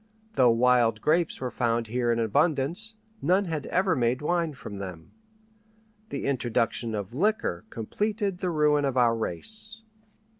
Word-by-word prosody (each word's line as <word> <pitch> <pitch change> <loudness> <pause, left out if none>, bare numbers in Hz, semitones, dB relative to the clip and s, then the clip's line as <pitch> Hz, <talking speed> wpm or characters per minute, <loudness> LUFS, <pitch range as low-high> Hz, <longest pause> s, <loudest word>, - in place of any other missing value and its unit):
Though 130 -3 +5
wild 115 -1 +3
grapes 165 +6 +1
were 125 -2 -3
found 115 -1 0
here 120 +1 0
in 115 - +1
abundance, 155 - +1 0.3
none 185 +6 +3
had 155 -5 -3
ever 185 -1 +2
made 125 +2 0
wine 165 -2 0
from 100 -5 -8
them. 90 -4 -8 1.0
The 140 - -4
introduction 120 -3 0
of 100 +1 -5
liquor 165 - 0
completed 205 - -2
the 185 - -1
ruin 150 -2 +3
of 135 -2 0
our 120 -2 +4
race. 215 - -3
130 Hz, 145 wpm, -27 LUFS, 115-175 Hz, 1.0 s, Though